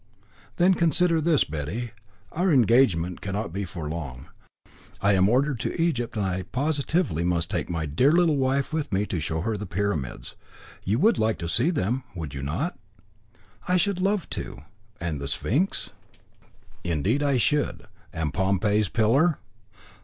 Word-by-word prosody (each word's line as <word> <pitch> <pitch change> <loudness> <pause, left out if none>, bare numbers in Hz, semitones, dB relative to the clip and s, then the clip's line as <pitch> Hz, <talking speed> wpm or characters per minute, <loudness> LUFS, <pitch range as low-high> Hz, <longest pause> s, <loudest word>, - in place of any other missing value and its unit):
"Then 180 +2 +4
consider 170 -1 +3
this, 160 -2 +3
Betty. 80 +11 -4 0.4
Our 180 +3 +1
engagement 115 - +3
cannot 100 -1 -3
be 100 +1 -2
for 85 -4 -6
long. 70 -6 -6 0.7
I 100 +1 +3
am 95 0 +4
ordered 130 +2 +2
to - - -3
Egypt, 125 -10 0
and 100 - 0
I 95 0 -1
positively 140 - 0
must 85 -1 0
take - - -2
my 80 -2 -2
dear 85 - +3
little 170 -3 +3
wife 135 +2 0
with 155 -5 -2
me 100 +1 +1
and 85 - -2
show 80 +2 -2
her 110 +4 -1
the 105 - -6
Pyramids. 90 -9 -3 0.5
You 105 +4 +1
would 220 - +3
like 110 0 +1
to 85 - -4
see 120 - +2
them, 130 - -1
would 80 -5 -5
you 70 - -5
not?" 85 - -3 0.9
"I 180 - +3
should 185 0 +1
love 195 -2 +1
to." - - -6 0.4
"And 80 -4 -3
the 70 - -3
Sphynx?" 145 - 0 0.9
"Indeed 90 - 0
I 140 -2 +2
should." 145 +4 0 0.3
"And 80 -3 -3
Pompey's 100 +2 +1
Pillar?" 135 +9 +3
110 Hz, 160 wpm, -25 LUFS, -, 0.9 s, Then